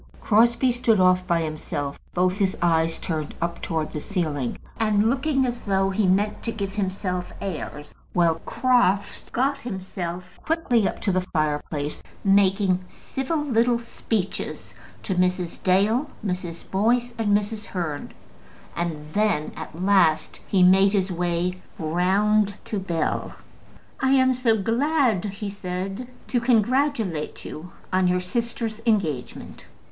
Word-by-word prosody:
Crosbie 235 Hz, +4 st, +4 dB
stood 235 Hz, -3 st, +2 dB
off 185 Hz, 0 st, +4 dB
by 170 Hz, -2 st, +2 dB
himself, 145 Hz, -2 st, -4 dB, 0.2 s
both 185 Hz, +2 st, +2 dB
his 190 Hz, -2 st, +1 dB
eyes 165 Hz, -1 st, +2 dB
turned 155 Hz, -4 st, -4 dB
up 170 Hz, 0 st, -3 dB
towards 160 Hz, -2 st, -2 dB
the 150 Hz, -, -2 dB
ceiling, 150 Hz, -, -2 dB, 0.2 s
and 215 Hz, 0 st, +3 dB
looking 270 Hz, 0 st, +1 dB
as 245 Hz, -1 st, -3 dB
though 195 Hz, -1 st, +1 dB
he 200 Hz, 0 st, +1 dB
meant 205 Hz, +3 st, +1 dB
to 230 Hz, -, -2 dB
give 200 Hz, -3 st, -4 dB
himself 185 Hz, -2 st, -2 dB
airs; 150 Hz, -5 st, -5 dB, 0.2 s
while 165 Hz, -2 st, +2 dB
Crofts 240 Hz, -6 st, +1 dB
got 275 Hz, +3 st, 0 dB
himself 185 Hz, -4 st, -6 dB
quickly 280 Hz, -10 st, +2 dB
up -, -, -5 dB
to 200 Hz, -, +1 dB
the 185 Hz, 0 st, +2 dB
fireplace, 150 Hz, -3 st, -2 dB, 0.2 s
making 195 Hz, -1 st, +3 dB
civil 295 Hz, +3 st, -3 dB
little 240 Hz, -3 st, +2 dB
speeches 225 Hz, -4 st, -4 dB, 0.3 s
to 195 Hz, -, -1 dB
Mrs. 180 Hz, -1 st, 0 dB
Dale, 210 Hz, +10 st, +2 dB, 0.2 s
Mrs. 180 Hz, -3 st, -3 dB
Boyce, 235 Hz, +5 st, +2 dB
and 205 Hz, -2 st, +4 dB
Mrs. 210 Hz, +1 st, -5 dB
Hearn. 165 Hz, -6 st, -4 dB, 0.6 s
And 165 Hz, -3 st, -3 dB
then 210 Hz, -8 st, +1 dB
at 160 Hz, +1 st, -8 dB
last 170 Hz, -6 st, +3 dB
he 190 Hz, -2 st, +3 dB
made 195 Hz, +2 st, +6 dB
his 190 Hz, -2 st, +1 dB
way 175 Hz, +1 st, -1 dB, 0.2 s
round 195 Hz, +5 st, +2 dB
to 210 Hz, -, -2 dB
Bell. 170 Hz, -4 st, -2 dB, 0.6 s
"I 265 Hz, 0 st, +3 dB
am 260 Hz, -1 st, +5 dB
so 240 Hz, -3 st, +2 dB
glad," 235 Hz, -, +2 dB
he 205 Hz, +1 st, -4 dB
said, 195 Hz, +4 st, -4 dB, 0.2 s
"to 245 Hz, -, +1 dB
congratulate 235 Hz, -, +1 dB
you 175 Hz, +4 st, -8 dB, 0.2 s
on 185 Hz, 0 st, +3 dB
your 180 Hz, 0 st, +2 dB
sister's 225 Hz, +3 st, -3 dB
engagement." 165 Hz, -, -1 dB
195 Hz, 135 wpm, -24 LUFS, 175-225 Hz, 0.6 s, made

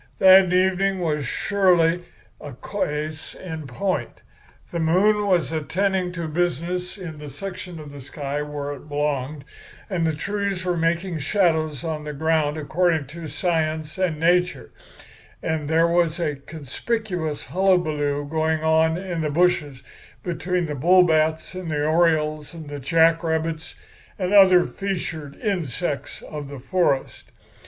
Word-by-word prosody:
That 190 Hz, -1 st, +7 dB
evening 190 Hz, +1 st, +2 dB
was 150 Hz, -6 st, -1 dB
surely 180 Hz, -2 st, +2 dB, 0.4 s
a 145 Hz, -, -7 dB
case 155 Hz, +1 st, -4 dB
in 160 Hz, -5 st, -7 dB
point. 145 Hz, -1 st, -3 dB, 0.5 s
The 170 Hz, -, -2 dB
moon 205 Hz, +6 st, +3 dB
was 175 Hz, -5 st, +2 dB
attending 180 Hz, +4 st, 0 dB
to 170 Hz, -2 st, -4 dB
business 175 Hz, +3 st, -2 dB
in 165 Hz, -6 st, -8 dB
the 150 Hz, -1 st, -8 dB
section 185 Hz, 0 st, -7 dB
of 150 Hz, -2 st, -10 dB
sky 145 Hz, +2 st, -4 dB
where 145 Hz, -1 st, -4 dB
it 145 Hz, +2 st, -12 dB
belonged, 145 Hz, -1 st, -2 dB, 0.5 s
and 170 Hz, -3 st, +1 dB
the 160 Hz, -, 0 dB
trees 200 Hz, +2 st, -2 dB
was 175 Hz, -2 st, 0 dB
making 170 Hz, +1 st, 0 dB
shadows 155 Hz, -, +1 dB
on 155 Hz, -2 st, -3 dB
the 150 Hz, 0 st, -5 dB
ground 155 Hz, 0 st, +1 dB
according 160 Hz, 0 st, +1 dB
to 170 Hz, -1 st, -7 dB
science 160 Hz, -1 st, -1 dB
and 170 Hz, -5 st, 0 dB
nature, 175 Hz, +2 st, +1 dB, 0.7 s
and 155 Hz, -2 st, -2 dB
there 165 Hz, +1 st, +4 dB
was 170 Hz, -1 st, +2 dB
a -, -, 0 dB
kind -, -, -10 dB
of 140 Hz, -, -25 dB
conspicuous 165 Hz, -, -3 dB
hullabaloo 155 Hz, -6 st, +1 dB
going 160 Hz, +1 st, 0 dB
on 160 Hz, +1 st, +3 dB
in 180 Hz, -3 st, -3 dB
the 155 Hz, -, 0 dB
bushes 150 Hz, -4 st, +1 dB, 0.4 s
between 180 Hz, 0 st, -1 dB
the 150 Hz, -, -4 dB
bullbats 160 Hz, +1 st, +3 dB
and 185 Hz, -2 st, -5 dB
the 150 Hz, -1 st, 0 dB
orioles 155 Hz, -1 st, +1 dB
and 155 Hz, -3 st, -9 dB
the 145 Hz, -, -5 dB
jack 165 Hz, +4 st, +3 dB
rabbits 160 Hz, 0 st, -2 dB, 0.4 s
and 185 Hz, 0 st, -1 dB
other 185 Hz, -3 st, +7 dB
feathered 165 Hz, -7 st, -4 dB
insects 175 Hz, -, -3 dB
of 150 Hz, -2 st, -7 dB
the 140 Hz, 0 st, -8 dB
forest. 140 Hz, 0 st, -1 dB
160 Hz, 145 wpm, -23 LUFS, 150-180 Hz, 0.7 s, That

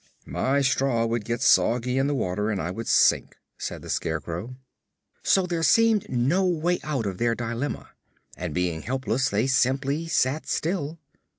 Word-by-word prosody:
"My 140 Hz, +2 st, 0 dB
straw 130 Hz, -3 st, +1 dB
would 115 Hz, -2 st, -2 dB
get 120 Hz, +1 st, -2 dB
soggy 125 Hz, +2 st, +3 dB
in 135 Hz, -, +2 dB
the 145 Hz, -, 0 dB
water 105 Hz, -2 st, -1 dB
and 105 Hz, -3 st, -1 dB
I 85 Hz, +2 st, -3 dB
would 115 Hz, +5 st, -6 dB
sink," -, -, +3 dB, 0.2 s
said -, -, -5 dB
the -, -, -9 dB
Scarecrow. 85 Hz, -, -3 dB, 0.7 s
So 190 Hz, -1 st, +3 dB
there 170 Hz, -2 st, -2 dB
seemed 225 Hz, +5 st, +3 dB
no 135 Hz, +10 st, +1 dB
way 175 Hz, -1 st, +1 dB
out 135 Hz, -7 st, -2 dB
of 95 Hz, -2 st, -4 dB
their 115 Hz, -1 st, +1 dB
dilemma 120 Hz, +4 st, -4 dB, 0.4 s
and 90 Hz, -2 st, -5 dB
being 85 Hz, -1 st, -1 dB
helpless 130 Hz, +1 st, -1 dB
they 105 Hz, +4 st, +1 dB
simply 135 Hz, +4 st, +1 dB
sat 155 Hz, -2 st, 0 dB
still. 165 Hz, -2 st, -2 dB
130 Hz, 165 wpm, -25 LUFS, 115-150 Hz, 0.7 s, soggy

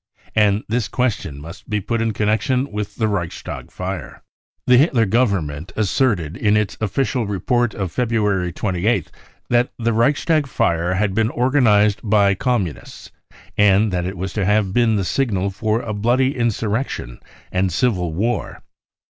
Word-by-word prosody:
And 105 Hz, -1 st, +3 dB
this 115 Hz, 0 st, -1 dB
question 100 Hz, -, -2 dB
must 85 Hz, +5 st, -11 dB
be 105 Hz, -1 st, 0 dB
put 115 Hz, +4 st, -2 dB
in 115 Hz, 0 st, +1 dB
connection 110 Hz, +6 st, 0 dB
with 105 Hz, -1 st, -4 dB
the 110 Hz, -, 0 dB
Reichstag 90 Hz, -6 st, -4 dB
fire. -, -, -6 dB, 0.4 s
The 125 Hz, -, +5 dB
Hitler 130 Hz, -6 st, +3 dB
government 95 Hz, -8 st, 0 dB
asserted 100 Hz, -, 0 dB
in 105 Hz, +1 st, +2 dB
its 105 Hz, -2 st, -1 dB
official 120 Hz, +2 st, -1 dB
report 110 Hz, +4 st, 0 dB
of 95 Hz, -4 st, -3 dB
February 105 Hz, -5 st, 0 dB
28th 95 Hz, 0 st, -1 dB, 0.4 s
that 120 Hz, +1 st, +2 dB
the 115 Hz, -1 st, 0 dB
Reichstag 145 Hz, +6 st, +2 dB
fire 85 Hz, -7 st, 0 dB
had 100 Hz, 0 st, 0 dB
been 110 Hz, +2 st, +1 dB
organised 115 Hz, -6 st, +3 dB
by 100 Hz, -2 st, +3 dB
Communists 100 Hz, -, -3 dB, 0.5 s
and 105 Hz, 0 st, +4 dB
that 90 Hz, 0 st, -1 dB
it 95 Hz, 0 st, -5 dB
was 95 Hz, +1 st, -4 dB
to 105 Hz, -, -1 dB
have 105 Hz, -1 st, +1 dB
been 115 Hz, -1 st, +3 dB
the 100 Hz, -2 st, 0 dB
signal 100 Hz, -6 st, 0 dB
for 110 Hz, +3 st, -1 dB
a 110 Hz, -, -4 dB
bloody 125 Hz, +6 st, +1 dB
insurrection 115 Hz, -, -2 dB, 0.3 s
and 95 Hz, 0 st, +1 dB
civil 90 Hz, -5 st, 0 dB
war. 110 Hz, +8 st, -2 dB
105 Hz, 150 wpm, -20 LUFS, 95-120 Hz, 0.5 s, The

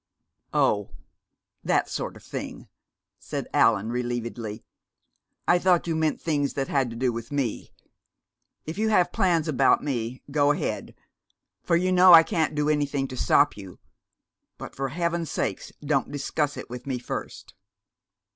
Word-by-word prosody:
"Oh, 105 Hz, 0 st, +2 dB, 0.7 s
that -, -, +1 dB
sort -, -, -4 dB
of -, -, -17 dB
thing," -, -, -7 dB, 0.5 s
said -, -, -5 dB
Allan 110 Hz, +4 st, +3 dB
relievedly. 120 Hz, -3 st, -4 dB, 0.8 s
"I 175 Hz, -, +5 dB
thought 180 Hz, -1 st, +3 dB
you 165 Hz, -2 st, -1 dB
meant 160 Hz, -1 st, 0 dB
things 145 Hz, -4 st, -1 dB
that 135 Hz, -1 st, -1 dB
had 135 Hz, -3 st, +1 dB
to 115 Hz, -, -8 dB
do 125 Hz, 0 st, 0 dB
with 115 Hz, +2 st, -7 dB
me. 135 Hz, -6 st, -2 dB, 0.9 s
If 160 Hz, +5 st, -6 dB
you 220 Hz, 0 st, +1 dB
have 180 Hz, -5 st, +3 dB
plans 175 Hz, -7 st, +1 dB
about 140 Hz, -6 st, +3 dB
me, 125 Hz, -3 st, -3 dB
go 145 Hz, 0 st, +3 dB
ahead, -, -, -4 dB, 0.7 s
for 170 Hz, -, +1 dB
you 185 Hz, +2 st, +1 dB
know 180 Hz, 0 st, +7 dB
I 165 Hz, -1 st, +10 dB
can't 160 Hz, -2 st, -1 dB
do 150 Hz, 0 st, 0 dB
anything 145 Hz, -2 st, 0 dB
to 130 Hz, -, -7 dB
stop -, -, +3 dB
you 95 Hz, -3 st, -11 dB, 0.8 s
but -, -, -9 dB
for 135 Hz, 0 st, -2 dB
heaven's 170 Hz, +2 st, -2 dB
sake, -, -, -3 dB
don't 140 Hz, -2 st, 0 dB
discuss 145 Hz, +1 st, -2 dB
it -, -, -7 dB
with 125 Hz, +2 st, -9 dB
me 130 Hz, -2 st, -1 dB
first!" 125 Hz, -, -7 dB
145 Hz, 155 wpm, -25 LUFS, 125-165 Hz, 0.9 s, I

